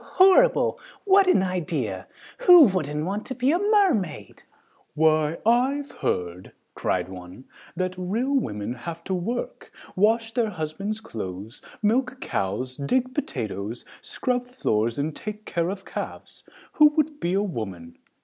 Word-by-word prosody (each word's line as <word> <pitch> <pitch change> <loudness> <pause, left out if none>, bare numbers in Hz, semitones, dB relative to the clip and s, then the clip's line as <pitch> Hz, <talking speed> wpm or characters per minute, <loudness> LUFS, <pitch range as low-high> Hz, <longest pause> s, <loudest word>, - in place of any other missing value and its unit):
Horrible! 385 +7 +4 0.3
What 395 -1 +5
an 365 - +4
idea! 150 - -3 0.4
Who 355 -3 +10
wouldn't 185 - -1
be 255 +2 +2
a 345 - +2
mermaid?" 380 - +1 0.5
"Why, 155 0 +2
I've 265 +5 +2
heard," 90 +1 -3 0.2
cried - - -1
one, 90 +5 -10 0.3
"that 185 0 -3
real 225 +10 -1
women 110 - -1
have 165 +7 -7
to 190 - -3
work, 225 +7 -4 0.2
wash 225 +3 +2
their 230 -1 +1
husband's 195 +5 -4
clothes, 105 - -7 0.2
milk 255 +5 +1
cows, 125 - -3
dig 255 - 0
potatoes, 110 - -4 0.2
scrub 245 -1 -2
floors 115 - -1
and 150 +2 -2
take 215 0 -7
care 170 0 -1
of 195 0 -6
calves. - - -7 0.3
Who 300 - +6
would 305 -1 0
be 175 - -1
a 200 +1 +2
woman? 95 - -6
185 Hz, 130 wpm, -25 LUFS, -, 0.5 s, Who